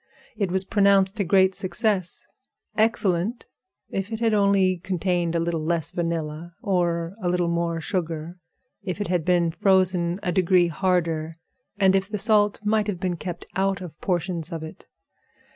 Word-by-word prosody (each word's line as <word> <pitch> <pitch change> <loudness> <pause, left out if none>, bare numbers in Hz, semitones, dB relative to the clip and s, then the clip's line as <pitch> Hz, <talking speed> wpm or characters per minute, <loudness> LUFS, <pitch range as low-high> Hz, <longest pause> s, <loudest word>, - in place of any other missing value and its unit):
It 200 -4 -1
was 190 +1 0
pronounced 200 0 +3
a - - +3
great 190 +1 +4
success—excellent 200 +1 -1 0.5
if 195 +3 -3
it 225 - -3
had 230 -2 +2
only 200 -3 +3
contained 175 -2 -1
a - - +2
little 165 -1 -1
less 165 0 0
vanilla 165 -1 -3
or 175 -2 0
a 180 - 0
little 175 -1 +1
more 170 -1 -1
sugar, 165 -3 -3 0.5
if 195 -1 -4
it 205 - -3
had 175 -3 +1
been 175 -1 +2
frozen 185 0 +2
a 180 - 0
degree 180 -1 +3
harder, 165 -2 -1 0.4
and 190 -1 +5
if 195 +1 0
the 210 - -2
salt 210 -1 +3
might 215 0 +1
have 195 -4 -3
been 180 -2 -1
kept 175 0 -6
out 195 +1 +1
of 175 -5 -10
portions 175 -2 -2
of 165 -1 -5
it. 160 - -10
180 Hz, 160 wpm, -24 LUFS, 170-195 Hz, 0.5 s, and